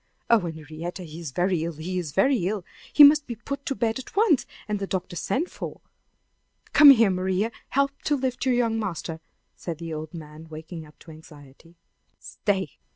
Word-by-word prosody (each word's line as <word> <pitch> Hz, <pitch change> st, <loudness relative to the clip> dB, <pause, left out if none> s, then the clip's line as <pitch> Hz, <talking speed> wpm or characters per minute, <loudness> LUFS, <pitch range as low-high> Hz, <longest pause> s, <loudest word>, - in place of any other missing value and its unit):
Oh, 230 Hz, -, +7 dB
Henrietta! 165 Hz, +1 st, -6 dB
he 160 Hz, -1 st, -9 dB
is 165 Hz, -3 st, -5 dB
very 175 Hz, +3 st, 0 dB
ill 170 Hz, 0 st, -3 dB
he 180 Hz, +4 st, -3 dB
is 165 Hz, -5 st, -5 dB
very 195 Hz, -, +2 dB
ill! 200 Hz, -3 st, -3 dB, 0.3 s
He 295 Hz, -, +8 dB
must 295 Hz, +1 st, +7 dB
be 240 Hz, -, -4 dB
put 280 Hz, +5 st, -6 dB
to 275 Hz, -, -1 dB
bed 230 Hz, 0 st, 0 dB
at 260 Hz, -, -11 dB
once, 395 Hz, -, +3 dB, 0.2 s
and 210 Hz, -1 st, -2 dB
the 195 Hz, -, -3 dB
doctor 185 Hz, -2 st, -3 dB
sent 290 Hz, -, -1 dB
for! -, -, -7 dB, 0.9 s
Come 295 Hz, 0 st, +9 dB
here, 230 Hz, -7 st, +7 dB
Maria! 190 Hz, +4 st, 0 dB, 0.2 s
Help 275 Hz, +1 st, +2 dB
me 280 Hz, -, -42 dB
to 295 Hz, -, +2 dB
lift 255 Hz, -1 st, -2 dB
your 255 Hz, -, +3 dB
young 230 Hz, -2 st, +1 dB
master," 170 Hz, -5 st, -4 dB, 0.4 s
said 170 Hz, -3 st, -6 dB
the 165 Hz, 0 st, -6 dB
old 155 Hz, +2 st, -6 dB
man, 155 Hz, 0 st, -10 dB
waking 160 Hz, +1 st, -8 dB
up 150 Hz, -, -20 dB
to 165 Hz, -, -12 dB
anxiety. 155 Hz, +1 st, -16 dB, 0.4 s
"Stay! 190 Hz, -6 st, -3 dB
185 Hz, 195 wpm, -25 LUFS, 160-240 Hz, 0.9 s, Come